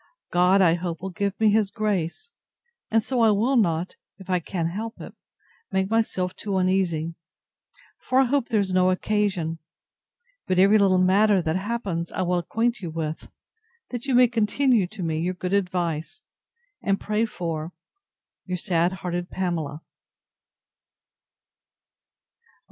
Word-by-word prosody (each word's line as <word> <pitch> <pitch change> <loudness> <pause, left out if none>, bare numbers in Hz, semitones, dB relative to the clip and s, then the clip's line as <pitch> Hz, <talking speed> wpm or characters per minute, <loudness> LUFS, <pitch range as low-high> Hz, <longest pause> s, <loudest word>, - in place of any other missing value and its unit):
God, 180 +2 +4
I 165 -2 +5
hope, 170 -1 -3
will 190 - -4
give 200 +2 -2
me 220 -1 +4
his 210 -1 +2
grace: 210 - -2 0.6
and 225 0 +2
so 255 0 0
I 225 - +6
will 220 +6 +2
not, 175 -6 +1 0.2
if 190 -1 -8
I 180 - +3
can 170 0 -3
help 220 +6 -6
it, - - -9 0.6
make 190 +1 0
myself 190 -5 0
too 200 -2 -3
uneasy; 180 -4 0 0.9
for 255 +1 +1
I - - +6
hope 265 0 0
there 225 -4 +1
is 190 -2 -1
no 185 0 +4
occasion. 185 -4 0 0.9
But 185 - +1
every 200 +3 +6
little 190 -2 +4
matter 195 +2 +4
that 160 0 0
happens, 190 -4 -3
I 185 - -2
will 180 0 +1
acquaint 230 +7 -1
you 175 - -4
with, 160 -1 -5 0.6
that 245 +2 -5
you 265 - +2
may 250 0 +7
continue 230 -1 +2
to 195 0 -7
me 160 -1 -1
your 180 +3 -1
good 180 +1 -4
advice, 180 - -1 0.6
and 195 0 0
pray 215 +2 0
for 165 -5 -4 0.8
Your 185 0 -2
sad 175 -1 +1
hearted 175 -1 -4
PAMELA. 165 -5 -3
190 Hz, 150 wpm, -24 LUFS, 175-215 Hz, 0.9 s, may